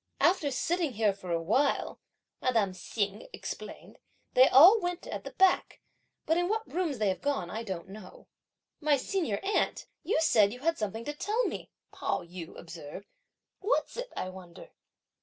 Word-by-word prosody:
"After 340 Hz, -4 st, +3 dB
sitting 320 Hz, +2 st, 0 dB
here 215 Hz, -2 st, +2 dB
for 185 Hz, -2 st, -8 dB
a 170 Hz, -, +1 dB
while," 255 Hz, -, +1 dB, 0.4 s
madame 225 Hz, -7 st, +2 dB
Hsing 205 Hz, +2 st, -3 dB
explained, -, -, -8 dB, 0.3 s
"they 255 Hz, +1 st, +7 dB
all 355 Hz, -, +9 dB
went 355 Hz, 0 st, -3 dB
at -, -, -5 dB
the -, -, -4 dB
back; 380 Hz, -1 st, +3 dB, 0.5 s
but 320 Hz, -, +2 dB
in 350 Hz, -, +1 dB
what 440 Hz, +1 st, -1 dB
rooms 335 Hz, -6 st, -1 dB
they 215 Hz, -2 st, +1 dB
have 185 Hz, -, -2 dB
gone, 275 Hz, -12 st, -1 dB
I 220 Hz, -, -3 dB
don't 190 Hz, -6 st, -5 dB
know." 195 Hz, -1 st, -12 dB, 0.5 s
"My 295 Hz, -2 st, +3 dB
senior 285 Hz, -, -1 dB
aunt, 400 Hz, +2 st, 0 dB, 0.2 s
you -, -, 0 dB
said 215 Hz, -10 st, +4 dB
you 250 Hz, -, -10 dB
had 330 Hz, +2 st, +1 dB
something 220 Hz, +2 st, -3 dB
to 295 Hz, -, -3 dB
tell 430 Hz, +10 st, 0 dB
me, -, -, -4 dB, 0.2 s
Pao -, -, -2 dB
yü 170 Hz, -1 st, -9 dB
observed; 165 Hz, +2 st, -9 dB, 0.5 s
what's 425 Hz, +6 st, 0 dB
it, -, -, -5 dB
I 185 Hz, -, -2 dB
wonder?" 185 Hz, -2 st, -12 dB
250 Hz, 170 wpm, -30 LUFS, -, 0.5 s, all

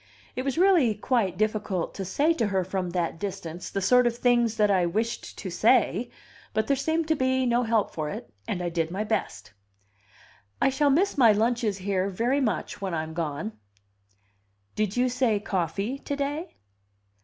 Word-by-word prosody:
It -, -, -1 dB
was 275 Hz, +1 st, -2 dB
really 340 Hz, -, +4 dB
quite 210 Hz, -5 st, 0 dB
difficult 210 Hz, -4 st, -1 dB
to 195 Hz, -, -5 dB
say 290 Hz, -, +2 dB
to 235 Hz, -9 st, 0 dB
her 190 Hz, -2 st, 0 dB
from 185 Hz, 0 st, -3 dB
that 170 Hz, -2 st, -2 dB
distance 185 Hz, -4 st, -5 dB
the 195 Hz, -, -3 dB
sort 250 Hz, +5 st, +5 dB
of 235 Hz, 0 st, -1 dB
things 240 Hz, -2 st, +2 dB
that 210 Hz, -1 st, +3 dB
I 185 Hz, -2 st, +3 dB
wished 220 Hz, +6 st, -3 dB
to -, -, -6 dB
say; -, -, +2 dB, 0.5 s
but 220 Hz, -, +2 dB
there 280 Hz, -, +2 dB
seemed 315 Hz, +4 st, -1 dB
to 315 Hz, -, +3 dB
be 260 Hz, -1 st, +1 dB
no 240 Hz, 0 st, +2 dB
help 225 Hz, -3 st, +1 dB
for 155 Hz, -2 st, -3 dB
it, 120 Hz, -5 st, -8 dB
and 180 Hz, -, -2 dB
I 175 Hz, -, -1 dB
did 165 Hz, -1 st, -1 dB
my 190 Hz, +5 st, -2 dB
best. 215 Hz, -, -3 dB, 1.1 s
"I -, -, +4 dB
shall 285 Hz, +2 st, +2 dB
miss 330 Hz, +3 st, +2 dB
my 235 Hz, -4 st, +7 dB
lunches 225 Hz, -1 st, +1 dB
here 190 Hz, 0 st, -1 dB
very 240 Hz, +8 st, 0 dB
much 215 Hz, -3 st, -2 dB
when 190 Hz, -3 st, -2 dB
I'm 160 Hz, 0 st, -4 dB
gone." 165 Hz, +5 st, -3 dB, 1.2 s
"Did 215 Hz, 0 st, -1 dB
you 250 Hz, +1 st, +3 dB
say 245 Hz, -4 st, +1 dB
coffee 195 Hz, -, -2 dB
to 285 Hz, -, -4 dB
day?" 290 Hz, +5 st, -3 dB
215 Hz, 180 wpm, -26 LUFS, 185-255 Hz, 1.2 s, my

